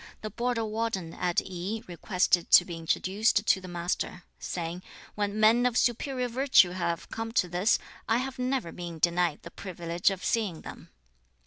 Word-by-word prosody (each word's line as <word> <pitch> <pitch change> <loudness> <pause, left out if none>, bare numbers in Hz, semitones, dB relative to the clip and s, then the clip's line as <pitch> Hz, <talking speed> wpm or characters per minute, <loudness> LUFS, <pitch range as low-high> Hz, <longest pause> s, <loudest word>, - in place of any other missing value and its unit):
The 215 - -5
border 240 -1 -1
warden 215 -6 -3
at 180 -1 0
Yi 190 +4 -4
requested 180 0 +1
to 175 - +8
be 175 - -6
introduced 195 +6 +1
to 190 - +3
the 185 - -9
Master, 175 0 -3 0.2
saying, 170 0 -4 0.3
'When 205 0 -2
men 225 +3 +5
of 245 -1 -1
superior 250 +1 0
virtue 250 -7 +4
have 170 -2 -2
come 225 0 -4
to 185 - +2
this, 180 +5 +2 0.3
I 225 - +4
have 260 +1 -4
never 250 -8 -1
been 170 -2 -7
denied 170 -1 +1
the - - -10
privilege 175 -1 -1
of 195 -2 -5
seeing 210 -9 0
them.' - - -10
190 Hz, 165 wpm, -28 LUFS, 175-225 Hz, 0.3 s, to